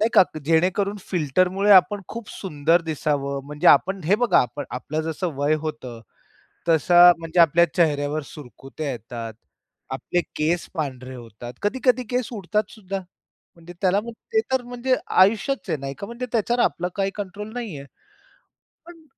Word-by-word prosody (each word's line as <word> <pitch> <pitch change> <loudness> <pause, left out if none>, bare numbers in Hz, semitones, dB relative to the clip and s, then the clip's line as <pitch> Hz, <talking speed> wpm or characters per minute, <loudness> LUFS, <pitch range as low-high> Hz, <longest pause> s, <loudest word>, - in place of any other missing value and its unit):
नाही 220 - +3
का? - - +9 0.2
जेणेकरून 185 +6 +1
फिल्टरमुळे 185 +5 +1
आपण 190 +2 +5
खूप 230 -2 -7
सुंदर 165 -1 0
दिसावं, 145 -3 -2
म्हणजे 150 +1 -3
आपण 190 +6 +4
हे 185 +6 +4
बघा 235 -5 +4
आपण 145 +3 -3
आपलं 150 +5 -3
जसं 170 +2 -3
वय 145 +2 +2
होतं 130 -7 -6 0.7
तस 160 -3 +3
म्हणजे 175 -1 +6
आपल्या 170 +1 +6
चेहऱ्यावर 150 -3 +1
सुरकुत्या 135 +2 -8
येतात, 115 -1 -7 0.6
आपले 135 +6 -1 0.2
केस 165 +3 0
पांढरे 130 -5 -4
होतात, 120 0 -10
कधी-कधी 250 +3 +1
केस 250 -2 -1
उडतात 210 0 -2
सुद्धा 195 -3 -5 0.6
म्हणजे 170 +1 -13
त्याला 190 +1 +3
मग 235 +2 -8 0.2
ते 440 - +5
तर 260 -1 +2
म्हणजे 245 +1 -1
आयुष्याचं 205 +4 +2
आहे 155 - -1
नाही 135 0 -5
का? 200 - -6
म्हणजे 235 +2 -6
त्याच्यावर 240 +1 +1
आपलं 180 +1 -1
काही 195 -1 0
कंट्रोल 205 +1 -6
नाहीये. 200 - -6 1.0
पण 335 -1 -14
175 Hz, 150 wpm, -23 LUFS, 145-210 Hz, 1.0 s, का